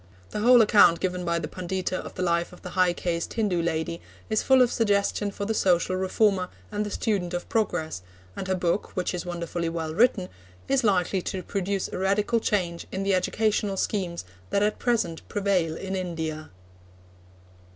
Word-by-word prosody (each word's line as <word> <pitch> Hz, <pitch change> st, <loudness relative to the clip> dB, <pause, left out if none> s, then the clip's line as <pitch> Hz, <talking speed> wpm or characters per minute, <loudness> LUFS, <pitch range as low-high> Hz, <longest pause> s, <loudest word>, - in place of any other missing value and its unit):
The -, -, -3 dB
whole 240 Hz, +2 st, +7 dB
account 205 Hz, -6 st, +6 dB
given 180 Hz, -1 st, -2 dB
by 170 Hz, -1 st, 0 dB
the -, -, -3 dB
Pundita 185 Hz, 0 st, -3 dB
of -, -, -6 dB
the 185 Hz, -, -2 dB
life 170 Hz, -1 st, +1 dB
of 180 Hz, -, -15 dB
the 180 Hz, -, -7 dB
high 185 Hz, -1 st, +3 dB
caste 170 Hz, -1 st, -3 dB
Hindu 205 Hz, -7 st, +1 dB
lady 165 Hz, 0 st, -2 dB, 0.3 s
is 215 Hz, -, +2 dB
full 265 Hz, -1 st, +5 dB
of 245 Hz, -, +1 dB
suggestion 205 Hz, -2 st, +1 dB
for 200 Hz, 0 st, -5 dB
the 225 Hz, -, 0 dB
social 185 Hz, -2 st, +2 dB
reformer 190 Hz, 0 st, +1 dB, 0.2 s
and 210 Hz, 0 st, -1 dB
the 210 Hz, -, -4 dB
student 195 Hz, -5 st, -1 dB
of 175 Hz, -, -4 dB
progress, 175 Hz, -, -1 dB, 0.3 s
and 190 Hz, -, -5 dB
her 190 Hz, -, +1 dB
book, 180 Hz, +2 st, -1 dB
which 180 Hz, -1 st, -1 dB
is 180 Hz, 0 st, -4 dB
wonderfully 170 Hz, -1 st, -3 dB
well 165 Hz, -1 st, -3 dB
written, 200 Hz, -2 st, +3 dB, 0.4 s
is 270 Hz, -1 st, +2 dB
likely 190 Hz, -2 st, +2 dB
to 185 Hz, +1 st, -4 dB
produce 195 Hz, -1 st, -2 dB
a -, -, -5 dB
radical 205 Hz, +4 st, +2 dB
change 175 Hz, -6 st, -1 dB
in 190 Hz, -, -2 dB
the 195 Hz, 0 st, +2 dB
educational 205 Hz, +1 st, +1 dB
schemes 180 Hz, -, -2 dB, 0.2 s
that 200 Hz, -, +2 dB
at 210 Hz, 0 st, 0 dB
present 220 Hz, -10 st, 0 dB
prevail 190 Hz, -6 st, +1 dB
in 190 Hz, 0 st, -4 dB
India. 160 Hz, -4 st, -4 dB
185 Hz, 180 wpm, -26 LUFS, 175-205 Hz, 0.4 s, whole